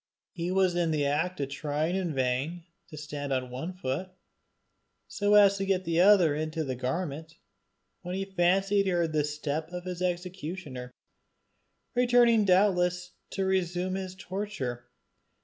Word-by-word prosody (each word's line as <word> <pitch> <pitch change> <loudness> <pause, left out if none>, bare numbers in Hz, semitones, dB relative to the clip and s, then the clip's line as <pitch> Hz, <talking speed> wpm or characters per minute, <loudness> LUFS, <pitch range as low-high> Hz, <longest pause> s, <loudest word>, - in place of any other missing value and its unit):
He 170 0 -4
was 185 -1 +2
in 175 -2 +1
the 150 -2 +1
act 160 +6 0
of 135 - -2
trying 150 +4 -2
in 180 -6 -2
vain 135 +7 -1 0.3
to 155 - -10
stand 145 -1 -5
on 130 -1 -1
one 135 +8 -4
foot, 180 +1 -3 1.0
so 205 0 +2
as 200 -1 +6
to 195 - -1
get 190 -1 +1
the 165 -1 0
other 185 -5 +6
into 155 +2 -2
the 135 -3 -3
garment, 150 +5 -4 0.7
when 180 +1 -5
he 195 0 -2
fancied 195 +2 +2
he - - +1
heard 170 -3 0
the 150 -1 +2
step 150 +1 -3
of 180 0 -6
his 180 -1 -5
executioner, 175 -7 -4 1.0
returning 240 -3 +4
doubtless 180 -2 +2 0.2
to 195 - -2
resume 185 -1 0
his 190 -1 -4
torture. 175 -12 -5
175 Hz, 150 wpm, -28 LUFS, 150-190 Hz, 1.0 s, as